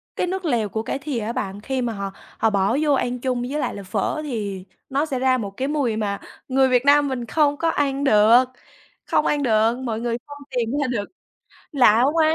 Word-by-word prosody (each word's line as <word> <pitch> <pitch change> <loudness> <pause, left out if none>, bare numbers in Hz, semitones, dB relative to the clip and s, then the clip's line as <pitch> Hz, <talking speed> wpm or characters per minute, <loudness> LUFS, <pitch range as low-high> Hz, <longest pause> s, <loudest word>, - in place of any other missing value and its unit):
cái - - -1
nước 375 0 -3
lèo 235 -8 0
của 220 +2 -3
cải 270 - -3
thìa 275 -4 -3
á 225 +1 -3
bạn. 205 -5 -4
Khi 260 +3 -2
mà 235 -2 -2
họ 200 -1 -4 0.3
họ 225 - +2
bỏ 200 +5 +1
vô 295 -2 +3
ăn 250 -2 -1
chung 250 -1 -1
với 275 +5 -3
lại - - -2
là 200 - -7
phở 200 +10 -2
thì 205 -8 -4 0.2
nó 280 +3 +1
sẽ 270 -5 -3
ra 260 0 +3
một 200 -4 -4
cái 265 +1 -1
mùi 280 -7 0
mà 200 -2 -2 0.3
người 265 0 +3
Việt 250 +1 +2
Nam 290 0 +5
mình 255 -3 -3
không 290 +4 +2
có 330 - +1
ăn 280 -2 0
được, 225 0 +6 0.6
không - - +1
ăn 290 -1 +1
được, 225 -1 +3
mọi 225 -3 -2
người 235 -1 -1
không 290 0 -9 0.2
tìm 235 -2 0
ra 275 - 0
được, 220 -5 -2 0.7
lạ 245 -5 +5
quá. 320 -1 +3
250 Hz, 230 wpm, -22 LUFS, 220-280 Hz, 0.7 s, được